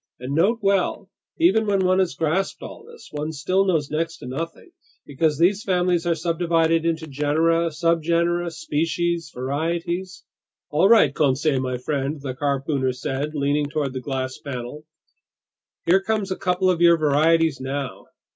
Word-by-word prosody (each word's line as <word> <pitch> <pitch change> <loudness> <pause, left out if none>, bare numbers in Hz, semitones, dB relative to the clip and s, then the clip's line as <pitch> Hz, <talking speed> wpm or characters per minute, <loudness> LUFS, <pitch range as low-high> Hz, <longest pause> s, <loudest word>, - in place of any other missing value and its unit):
"And 125 +3 -5
note 195 +10 +3
well, 195 0 0 0.3
even 210 +6 +3
when 195 -2 +2
one 185 +1 +3
has 180 -7 0
grasped 165 +6 -1
all - - -9
this, 470 +1 -14
one 150 +1 -3
still 185 +6 0
knows 160 -7 0
next 165 +2 -2
to - - -11
nothing, 165 - -6 0.3
because 150 +1 0
these 185 +5 +3
families 180 -2 +1
are 170 - +2
subdivided 165 0 +1
into 160 -1 -1
genera, 160 +4 +1
subgenera, 170 +1 0
species, 165 +1 -2
varieties—" 170 +7 -3 0.5
"All 165 +6 +3
right, 220 -12 +6
Conseil 140 0 +1
my 130 -1 -2
friend," 140 +3 -3
the 135 -2 -5
harpooner 135 -1 -1
said, 135 +4 -4
leaning 145 +1 0
toward 145 -3 -2
the 130 - -4
glass 130 -1 -4
panel, 140 +2 -7 1.0
"here 185 +3 +4
come 220 +1 -1
a - - 0
couple 185 0 +1
of 170 -2 -2
your 170 -1 +6
varieties 155 0 +2
now!" 135 0 -4
160 Hz, 155 wpm, -23 LUFS, 145-175 Hz, 1.0 s, right